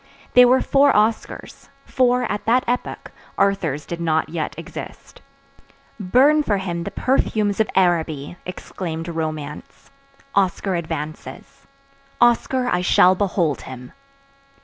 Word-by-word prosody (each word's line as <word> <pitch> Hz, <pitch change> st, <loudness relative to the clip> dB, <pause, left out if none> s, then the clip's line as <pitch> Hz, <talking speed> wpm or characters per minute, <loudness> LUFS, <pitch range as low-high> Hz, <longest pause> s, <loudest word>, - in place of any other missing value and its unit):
They 250 Hz, 0 st, +8 dB
were 255 Hz, +2 st, +4 dB
four 280 Hz, 0 st, +4 dB
Oscars; 215 Hz, +2 st, -1 dB, 0.2 s
for, 250 Hz, -1 st, +2 dB
at 210 Hz, -3 st, -3 dB
that 245 Hz, +3 st, +3 dB
epoch, 245 Hz, +1 st, -3 dB, 0.3 s
Arthurs 165 Hz, -7 st, 0 dB
did 170 Hz, 0 st, -6 dB
not 160 Hz, -1 st, 0 dB
yet 160 Hz, -2 st, -4 dB
exist. -, -, -10 dB, 0.8 s
Burn 260 Hz, +10 st, +4 dB
for 210 Hz, -8 st, 0 dB
him 170 Hz, -3 st, -4 dB
the -, -, -3 dB
perfumes 215 Hz, -2 st, 0 dB
of 220 Hz, -, +2 dB
Araby! 165 Hz, -5 st, 0 dB
exclaimed 170 Hz, -2 st, -6 dB
romance. 155 Hz, -3 st, -6 dB, 0.4 s
_Oscar 190 Hz, 0 st, +1 dB
advances. 150 Hz, -4 st, -7 dB, 0.5 s
Oscar, 245 Hz, +1 st, +2 dB
I 180 Hz, -7 st, +1 dB
shall 180 Hz, +1 st, +5 dB
behold 180 Hz, -6 st, -1 dB
him! 125 Hz, -1 st, -10 dB
185 Hz, 120 wpm, -21 LUFS, 160-230 Hz, 0.8 s, They